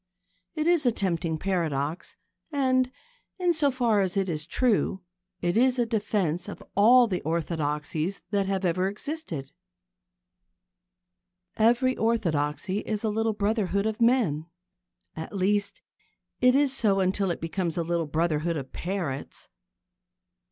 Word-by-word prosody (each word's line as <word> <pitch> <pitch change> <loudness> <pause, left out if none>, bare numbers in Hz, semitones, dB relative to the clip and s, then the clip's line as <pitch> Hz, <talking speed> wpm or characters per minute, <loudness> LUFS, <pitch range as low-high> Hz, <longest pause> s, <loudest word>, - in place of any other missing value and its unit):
It 310 -1 -1
is 335 -5 +3
a - - +5
tempting 170 -6 -1
paradox, 165 -3 -2 0.4
and, 255 -3 +2 0.5
in 355 -2 +2
so 300 -3 +2
far 240 -5 +2
as 190 0 -1
it 195 -1 +1
is 155 -1 -3
true, 205 -4 +1 0.4
it 175 0 0
is 255 +2 +4
a 240 - +2
defence 205 -6 -1
of - - -9
all 240 +5 +7
the 185 -6 -2
orthodoxies 160 +2 -2
that 200 -2 +1
have 195 -1 -1
ever 185 +2 +1
existed. 205 - -5 2.0
Every 240 +4 +3
orthodoxy 185 -4 0
is 215 0 -3
a 220 - +1
little 225 +1 0
brotherhood 205 -1 0
of 220 +1 -2
men. 225 - +2 0.7
At 160 +5 -7
least, 200 +2 0 0.6
it 250 0 +5
is 280 -1 +3
so 205 -7 +2
until 190 +1 +1
it 170 - -2
becomes 165 0 -3
a 170 - +1
little 170 -1 -1
brotherhood 160 +1 0
of 135 -2 -7
parrots. 170 -7 -4
195 Hz, 135 wpm, -27 LUFS, 170-230 Hz, 2.0 s, all